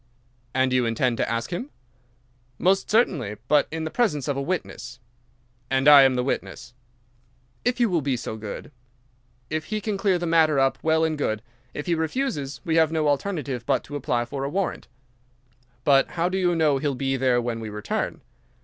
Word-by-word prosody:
"And 130 0 +2
you 125 -2 +2
intend 115 +1 0
to - - -1
ask 115 0 -2
him?" 210 +11 -4 0.9
"Most 190 +2 +2
certainly—but 145 - +1
in 160 0 -4
the 160 - -4
presence 195 - 0
of 140 - 0
a 140 - -2
witness." 135 -6 -4 0.7
"And 135 +1 +1
I 145 -1 +10
am 135 -1 +4
the 125 - 0
witness?" 125 -1 -4 0.9
"If 245 0 0
you 240 - +4
will 175 -5 +1
be 135 -2 0
so 115 - -5
good. 110 +5 -7 0.8
If 155 0 -2
he 215 -1 -2
can 210 -1 -3
clear 195 -2 +2
the 175 - -3
matter 160 -3 +3
up, 135 0 +2
well 160 0 +2
and 155 -2 0
good. 110 -5 -1 0.3
If 150 - -4
he 175 - +1
refuses, 160 - -2
we 165 -1 +1
have 160 -1 +4
no 160 -2 +1
alternative 145 - -2
but - - +1
to 145 - -8
apply 120 -3 -1
for 135 +2 -5
a 140 - -2
warrant." 190 +4 -2 1.0
"But 140 -3 +4
how 170 +2 +2
do 190 - -2
you 175 -2 +2
know 150 -4 +2
he'll 140 -1 -1
be 135 +1 -1
there 130 -2 +2
when 120 -1 -3
we 110 -1 -6
return?" 105 0 -3
145 Hz, 190 wpm, -24 LUFS, 130-170 Hz, 1.0 s, I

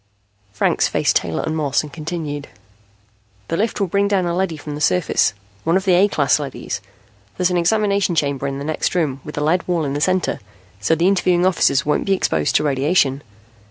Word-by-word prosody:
Franks 100 - +1
faced - - +1
Taylor 80 - 0
and 160 - -2
Moss 145 -3 0
and 150 - -10
continued: 150 -3 -5 1.0
"The - - 0
lift 220 +3 -1
will 200 - +2
bring 200 +3 +1
down 195 -3 +1
a 170 0 -1
leady 180 -3 -1
from 150 0 -7
the 145 - -6
surface, 160 -10 +2 0.3
one 165 +3 +2
of 190 - -3
the 185 - +4
A 185 +3 +5
class 145 -7 +2
leadys. 140 -3 -5 0.6
There's 180 0 +1
an 180 - +1
examination 200 0 +1
chamber 140 -2 0
in 135 0 -3
the 140 - -5
next 155 +3 -1
room, 145 -6 0
with 150 - -9
a - - -1
lead 170 +5 +1
wall 170 -3 0
in 135 - -2
the 145 - -2
center, 185 +2 +1 0.4
so 110 +10 +2
the 170 +3 +2
interviewing 180 -2 +2
officers 140 -7 +2
won't 150 - 0
be 195 - +3
exposed 80 - 0
to - - +3
radiation. 140 0 +1
160 Hz, 205 wpm, -20 LUFS, 145-185 Hz, 1.0 s, A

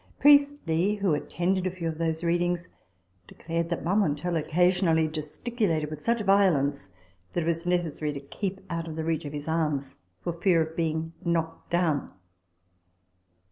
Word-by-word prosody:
Priestley, 280 - +4
who 200 -5 +1
attended 180 +5 0
a - - +1
few 180 -2 -5
of 160 -1 -4
those 160 0 -1
readings, 175 +1 0 0.6
declared 165 0 -3
that 170 - -2
Marmontel 175 -2 +1
occasionally 165 0 +3
gesticulated 155 +1 -2
with 155 - -6
such 235 -1 +1
violence 160 - +2 0.4
that 175 - 0
it - - -4
was 170 +1 -1
necessary 165 -4 0
to 140 - -5
keep 190 +7 -5
out 165 -2 -3
of 160 - -6
the 160 - -3
reach 160 0 -1
of 145 - -6
his 145 0 -5
arms 150 -4 -1 0.2
for 170 - -3
fear 170 0 +3
of 160 +1 -8
being 165 0 -1
knocked 165 -1 -2
down. 170 -4 +1
165 Hz, 155 wpm, -27 LUFS, 160-180 Hz, 0.6 s, Priestley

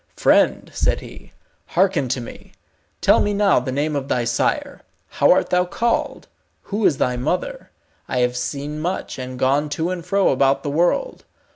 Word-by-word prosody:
"Friend," - - +2
said - - 0
he, - - -13 0.4
"hearken 180 -6 +1
to 130 - -1
me. 120 - -11 0.5
Tell - - +5
me 205 0 0
now 200 -6 +4
the 125 +1 -4
name 145 +3 -1
of 140 -1 -3
thy 125 -3 0
sire. 115 - -1 0.3
How - - +2
art - - +2
thou 180 0 +3
called; 230 +6 -2 0.4
who 205 +1 +1
is 145 - +1
thy 125 -1 0
mother? - - -3 0.4
I 125 - -1
have 125 0 +1
seen 140 +4 -4
much, 175 -3 -4
and 130 0 -6
gone 140 +4 +1
to 165 +3 -1
and 180 -2 -4
fro 195 +3 +2
about 135 +1 +2
the 145 - -2
world. 175 - 0
150 Hz, 175 wpm, -21 LUFS, 130-185 Hz, 0.5 s, Tell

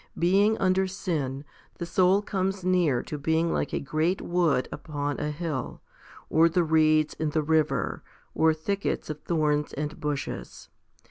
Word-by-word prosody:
Being 200 +5 +3
under 190 0 +2
sin, 150 -7 -3 0.3
the 170 - -4
soul 185 +3 +3
comes 195 -1 -2
near 175 -9 +2
to 150 - -6
being 160 +3 +1
like - - -1
a - - -1
great 155 +6 0
wood 170 -7 +1
upon 145 -2 -4
a 150 - -2
hill, 150 -4 -4 0.5
or 165 +2 +4
the 175 +1 +2
reeds 155 -1 +3
in 155 -1 -2
the 155 +1 0
river, 160 0 +1 0.3
or 160 0 +4
thickets 160 +2 -2
of 150 0 -8
thorns 150 -3 0
and 150 +1 -4
bushes. 145 -3 -5
160 Hz, 150 wpm, -27 LUFS, 150-180 Hz, 0.5 s, or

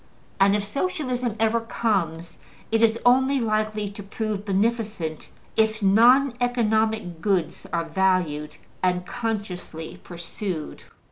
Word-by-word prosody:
And 195 +1 +5
if 205 -1 -1
Socialism 255 - -2
ever 225 +1 +3
comes, 175 -8 -2 0.3
it 225 0 +2
is 230 0 +4
only 265 +2 +4
likely 215 -2 0
to 205 +1 -9
prove 210 0 -4
beneficent 205 -5 -1 0.3
if 220 -1 +1
non 240 +7 +5
economic 220 -7 0
goods 185 -5 -1
are 170 -1 0
valued 165 -4 0 0.3
and 180 -1 +1
consciously 200 -8 -5
pursued. 175 -1 -6
210 Hz, 115 wpm, -24 LUFS, 180-230 Hz, 0.3 s, And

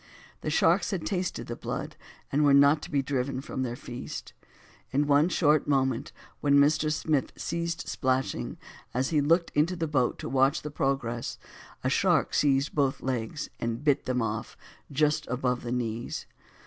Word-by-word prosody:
The - - -3
sharks - - +3
had 190 -6 -3
tasted 180 - -2
the 120 - -5
blood, - - -5 0.4
and 145 +2 +2
were 140 -1 +6
not 140 +2 +6
to - - -8
be 140 -2 +1
driven 130 -1 -1
from 135 -1 -5
their 120 -2 -2
feast; 120 0 -7 0.6
in 145 +2 +1
one 145 +3 +4
short 155 -4 +3
moment, 130 -4 +1 0.3
when 140 -1 +3
Mr. 150 +2 +4
Smith 150 -2 0
ceased 170 0 -3
splashing 130 0 -1 0.4
as 130 +1 +1
he 155 -3 +2
looked 165 +4 +2
into 160 +5 +2
the 165 -2 -1
boat 135 -5 +1
to - - -6
watch 135 +4 +2
the 150 - -5
progress, 135 -4 -2 0.5
a - - +1
shark - - +2
seized 140 0 +2
both 140 -3 0
legs, 130 +3 -3
and 115 +3 -3
bit 145 -3 +2
them 125 -2 0
off 110 0 -4 0.3
just 150 +2 +1
above 125 0 -1
the 120 - -5
knees. 120 -1 -3
140 Hz, 170 wpm, -28 LUFS, 125-150 Hz, 0.6 s, were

